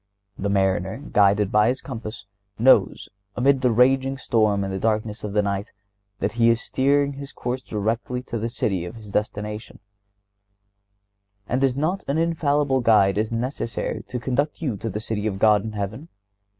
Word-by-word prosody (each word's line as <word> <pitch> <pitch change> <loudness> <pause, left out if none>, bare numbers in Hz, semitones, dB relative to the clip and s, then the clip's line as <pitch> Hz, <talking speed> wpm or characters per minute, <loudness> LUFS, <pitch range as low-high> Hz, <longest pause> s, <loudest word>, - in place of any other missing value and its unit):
The 100 - -3
mariner, 95 -1 +1
guided 105 -7 +2
by 105 +1 +4
his 125 +3 0
compass, 110 -5 -7 0.3
knows, 130 +4 +4 0.3
amid 135 +2 +3
the 125 - +3
raging 135 +3 +3
storm 110 -5 +1
and 95 0 -3
the 95 - -3
darkness 110 +1 -1
of 105 -1 -4
the 105 0 +2
night, 100 +2 -3 0.5
that 100 - -1
he 115 0 +3
is 115 0 +3
steering 140 +4 +1
his 140 0 -8
course 125 +1 -4
directly 115 +3 -2
to 115 - -4
the 115 +2 -2
city 95 -6 -1
of 90 - -7
his 110 -3 -11
destination; 105 +1 -3 1.7
and 130 +3 0
is 130 -2 +2
not 160 +7 -1
an 140 - 0
infallible 150 -4 +1
guide 105 -4 +4
as 110 +1 -1
necessary 115 0 -3
to 125 - -4
conduct 135 +5 -1
you 135 -9 -2
to 115 - -4
the 105 - -4
city 110 -1 -3
of 100 -3 -2
God 105 0 +4
in 110 - -5
heaven? 105 +9 -5
115 Hz, 175 wpm, -23 LUFS, 105-130 Hz, 1.7 s, by